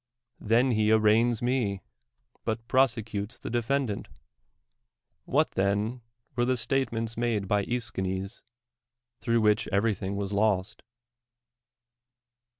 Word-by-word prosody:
Then 120 +4 +3
he 110 -1 +2
arraigns 110 +2 +3
me. 120 -6 0 0.6
but 115 +1 -3
prosecutes 115 -6 0
the - - -7
defendant. 120 -2 -1 1.2
What, - - +2
then, 105 +5 0 0.3
were 120 - +1
tho 130 +1 +2
^jtatements 115 -2 -1
made 115 -4 0
by 105 - +2
146 100 - -1 0.3
DEMOSTHENES 95 +1 -2
.Escliines, 120 0 -52
through 115 -1 +1
which 105 0 +3
everything 100 -1 0
was 100 0 -3
lost? 100 -2 +1
115 Hz, 110 wpm, -28 LUFS, 100-120 Hz, 1.2 s, Then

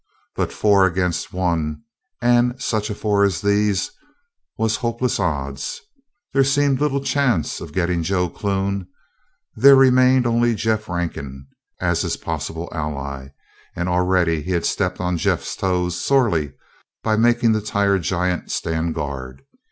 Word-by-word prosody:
But - - -1
four 100 -2 +3
against 90 -1 -2
one 85 -2 -1 0.4
and 120 +1 +3
such 110 -4 -1
a 105 - -3
four 105 -1 +1
as 100 -4 +1
these 100 -1 +1 0.7
was 110 0 +1
hopeless 120 0 -1
odds. 70 -7 -3 0.5
There 135 - +4
seemed 140 0 +2
little 140 -2 0
chance 130 - 0
of - - -8
getting 85 +1 0
Joe 90 +1 0
Clune. 100 0 -2 0.7
There 135 +5 +7
remained 130 -1 +5
only 120 0 +2
Jeff 110 0 -1
Rankin 70 -6 -4 0.3
as - - +1
his - - -2
possibly 80 +2 -4
ally, 70 -4 -5 0.5
and 90 +1 -2
already 90 -2 +1
he 90 +5 -3
had 85 - 0
stepped 90 -2 -1
on 90 -1 -1
Jeff's - - -1
toes 90 -2 -1
sorely, 105 - +2 0.5
by 110 -1 +2
making 120 +1 +3
the 110 -1 +1
tired 100 -2 +1
giant 90 0 -1
stand 80 0 -2
guard. 65 -3 -5
95 Hz, 140 wpm, -21 LUFS, 85-115 Hz, 0.7 s, There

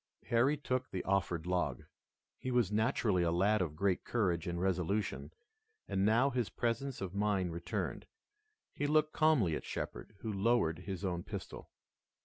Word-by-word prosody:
Harry 130 +6 +3
took 130 -2 -2
the 95 - -3
offered 90 -4 0
log. 90 0 -1 0.6
He 130 - -4
was 120 -6 +2
naturally 110 -3 +2
a 85 -1 +2
lad 100 +4 +3
of 80 -4 -2
great 95 +2 +1
courage 90 -8 0
and 85 0 -2
resolution, 95 +2 -1 0.6
and 95 - 0
now 115 +7 +4
his 125 -4 -1
presence 125 +2 -2
of 95 -2 -4
mind 100 -4 0
returned. 85 +1 -3 0.7
He 145 - -1
looked 155 +1 +3
calmly 140 - +3
at - - -4
Shepard, - - -5
who 110 -2 -3
lowered 100 -5 +2
his 95 +1 -5
own 90 -2 -1
pistol. - - -7
100 Hz, 155 wpm, -34 LUFS, 90-120 Hz, 0.7 s, now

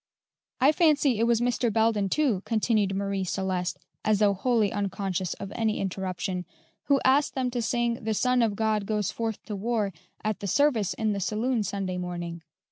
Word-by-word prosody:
"I 270 +3 +6
fancy 295 - +3
it 230 - +3
was 235 -1 +3
Mr. 240 -1 +1
Belden, 220 -2 +2
too," 255 -7 +1
continued 215 -3 +1
Marie 195 -1 -1
Celeste, 185 -1 -2 0.3
as 215 -1 +3
though 205 -1 +4
wholly 215 +1 +1
unconscious 195 -3 -2
of 195 - -7
any 220 -1 0
interruption, 185 -1 -3 0.4
"who 280 -1 +3
asked 275 +3 +3
them 255 -2 0
to 240 -1 -1
sing 235 0 0
'The 220 0 0
Son 250 +2 +2
of 220 -3 +1
God 215 -1 0
goes 210 -3 0
forth 225 -2 -3
to 210 - -5
war' 210 -1 -1 0.3
at 215 -1 -1
the 200 - -4
service 235 -3 +2
in 215 -2 0
the 200 - -2
saloon 225 +5 0
Sunday 195 -3 -3
morning. 175 -1 -5
215 Hz, 180 wpm, -27 LUFS, 195-235 Hz, 0.4 s, I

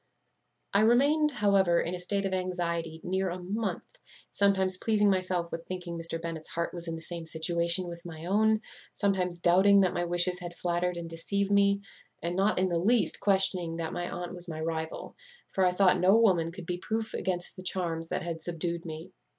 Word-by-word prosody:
"I 200 - +4
remained, 285 +7 +4
however, 200 - +3
in 170 - -2
a 180 - -4
state 195 +2 -2
of 190 - -1
anxiety 170 -3 -2
near 190 +1 -1
a 175 - -4
month; 215 - -4 0.3
sometimes 190 -2 +2
pleasing 210 0 +2
myself 185 -2 -1
with 165 0 -6
thinking 180 -2 -5
Mr. 165 0 -3
Bennet's 165 -1 -5
heart 170 0 -3
was 170 -1 -6
in 165 - -3
the 160 - -8
same 170 -1 -5
situation 170 +2 +2
with 170 0 -8
my 165 -1 -8
own; 215 +3 +2 0.3
sometimes 185 -3 0
doubting 190 +4 +5
that 185 - +2
my 175 - -1
wishes 175 +1 +2
had 175 -1 -7
flattered 175 0 -1
and 170 -1 -5
deceived 195 +5 -2
me, 200 0 +3 0.4
and 170 +1 -3
not 195 +3 +2
in 185 +1 +2
the 170 -1 0
least 225 +6 +2
questioning 190 -4 +2
that 165 -1 -4
my 175 0 -3
aunt 175 0 -5
was 175 0 -6
my 160 -2 -5
rival; 160 0 -4 0.3
for 190 - 0
I - - +3
thought 185 0 +3
no 190 +4 +5
woman 180 -7 +3
could 180 0 -9
be 180 +1 -3
proof 220 +3 -3
against 180 -1 -3
the 185 - -9
charms 170 -3 0
that - - -2
had 165 -1 -4
subdued 170 0 -3
me. 160 +3 -7
180 Hz, 200 wpm, -29 LUFS, 170-195 Hz, 0.4 s, doubting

